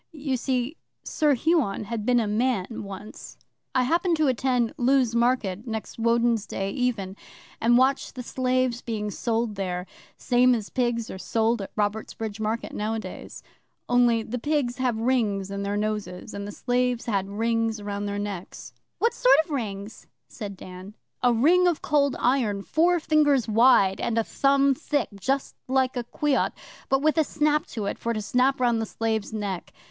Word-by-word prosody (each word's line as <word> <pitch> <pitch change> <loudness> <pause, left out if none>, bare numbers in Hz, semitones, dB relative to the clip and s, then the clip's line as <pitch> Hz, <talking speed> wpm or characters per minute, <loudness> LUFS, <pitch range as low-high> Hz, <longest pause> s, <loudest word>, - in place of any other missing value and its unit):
You 280 -3 -2
see, 255 +3 -1 0.3
Sir 295 -2 +2
Huon 270 - +1
had 225 0 -4
been 245 -1 +4
a 225 - +1
man 215 -1 +1 0.2
once. 200 +2 -9 0.4
'I 255 - +4
happened 335 +5 +1
to 310 -1 +2
attend 250 -1 +1
Lewes 260 -3 +2
Market 235 -3 0
next 220 0 -5
Woden's 230 -1 +2
Day 195 0 -3
even, 215 -6 -2 0.5
and 240 +1 +5
watched 265 +2 +1
the 250 - -5
slaves 255 -1 0
being 210 -3 -3
sold 230 +1 -1
there 180 -2 -3 0.3
same 250 0 +3
as 215 -3 -5
pigs 240 -2 -1
are 190 - -7
sold 225 +2 0
at 195 - -6
Robertsbridge 215 0 -3
Market 220 +2 -2
nowadays. 220 +1 -5 0.4
Only, 240 -2 +3
the 245 +3 -4
pigs 280 -3 0
have 250 -3 0
rings 220 -5 0
on 200 0 -3
their 200 +1 -2
noses, 210 -2 -3
and 200 0 -5
the - - -6
slaves 245 +1 0
had 195 -4 -1
rings 225 +1 0
round 205 0 -4
their 200 0 -3
necks.' 205 -3 -6 0.2
'What 465 - +2
sort - - +5
of 325 - -13
rings?' 210 -5 -5 0.2
said 200 -4 -7
Dan. 185 +3 -10 0.3
'A 245 - +4
ring 340 +10 +4
of 345 -3 0
Cold 285 -2 +2
Iron, 235 -6 +1
four 345 - +2
fingers 295 -5 +3
wide, 220 -4 +4
and 230 - -1
a 230 - +3
thumb 275 +3 +3
thick, 290 0 -1
just 270 +6 -1
like 260 0 +1
a 245 -1 -3
quoit, 290 +3 0 0.4
but 270 +1 +2
with 310 +1 +3
a - - +5
snap 300 0 0
to 215 -3 -5
it 200 - -3
for 235 - -1
to 215 - -3
snap 255 +6 +2
round 240 -2 +2
the 220 - -3
slave's 220 -1 -2
neck. 205 -4 -4
235 Hz, 175 wpm, -25 LUFS, 210-260 Hz, 0.5 s, and